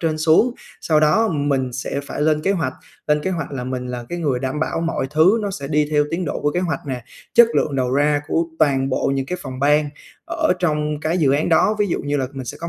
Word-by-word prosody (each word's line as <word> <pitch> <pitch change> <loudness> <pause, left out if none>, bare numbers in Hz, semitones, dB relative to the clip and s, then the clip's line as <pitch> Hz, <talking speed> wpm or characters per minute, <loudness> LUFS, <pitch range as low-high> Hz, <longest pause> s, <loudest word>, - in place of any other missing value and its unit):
trên 160 -2 -1
xuống, 160 +10 +3 0.3
sau 155 -2 +2
đó 185 +9 +3
mình 140 -5 -1
sẽ 130 +2 -3
phải 140 - -6
lên 155 0 +2
kế 195 - +1
hoạch, 165 -9 -1 0.3
lên 150 0 +2
kế 190 - -1
hoạch 165 -6 -4
là 125 -3 -4
mình 125 -1 -4
là 125 -1 -5
cái 175 - -4
người 145 -7 0
đảm 130 +3 -3
bảo 160 - -1
mọi 165 -5 -1
thứ 160 +9 +4
nó 205 - -2
sẽ 140 -8 -6
đi 150 0 +2
theo 150 -1 +3
tiến 175 +2 -2
độ 145 - -3
của 145 - +1
kế 175 - 0
hoạch 170 -5 -2
nè, 125 -3 -4 0.3
chất 235 -1 +8
lượng 140 -2 0
đầu 125 -1 0
ra 145 +1 +2
của 165 +1 +1
toàn 135 -3 +2
bộ 130 - 0
những 135 -1 -2
cái 180 - -4
phòng 130 -1 -7
ban 150 +1 +3 0.4
ở - - +1
trong 150 -3 -1
cái 160 +3 0
dự 140 -5 +3
án 145 +2 +1
đó, 190 +6 +3
ví 210 - +2
dụ - - -1
như 145 0 -2
là 130 -2 -1
mình 135 -2 -6
sẽ - - -6
có 170 - -4
150 Hz, 265 wpm, -20 LUFS, 135-165 Hz, 0.4 s, chất